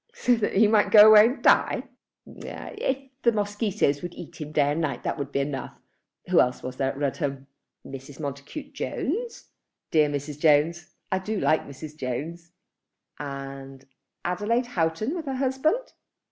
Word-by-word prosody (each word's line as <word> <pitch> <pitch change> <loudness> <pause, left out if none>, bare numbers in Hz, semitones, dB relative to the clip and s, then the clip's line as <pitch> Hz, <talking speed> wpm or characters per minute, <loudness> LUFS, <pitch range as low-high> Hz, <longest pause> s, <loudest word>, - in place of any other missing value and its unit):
"So 365 - +2
that 210 - -1
he 210 +2 +6
might 210 -1 +3
go 210 0 +9
away 215 +1 +9
and 250 - -4
die?" - - +4 0.4
"If 265 0 -5
the 235 - +4
mosquitoes 205 - 0
would 175 0 -6
eat 170 -1 -10
him 150 0 -6
day 145 -1 +2
and 155 +3 -1
night, 140 -6 -2
that - - -2
would 140 0 -4
be 140 - 0
enough. 140 -2 -5 0.5
Who - - +6
else 125 0 -1
was 130 0 -6
there 135 -1 0
at 135 - -6
Rudham?" 140 -1 -2 0.4
"Mrs. 135 +1 -10
Montacute 145 - -7
Jones." 455 - -4 0.4
"Dear 155 -2 +4
Mrs. 145 0 -5
Jones. 155 +2 +2 0.2
I 190 - +1
do 210 +2 -3
like 155 - +1
Mrs. 145 +2 -9
Jones." 155 +6 -5 0.7
"And 135 -1 -7 0.4
Adelaide 210 +8 0
Houghton 170 - 0
with 330 -3 -5
her 270 - -2
husband." 275 - 0
165 Hz, 160 wpm, -26 LUFS, 140-220 Hz, 0.7 s, go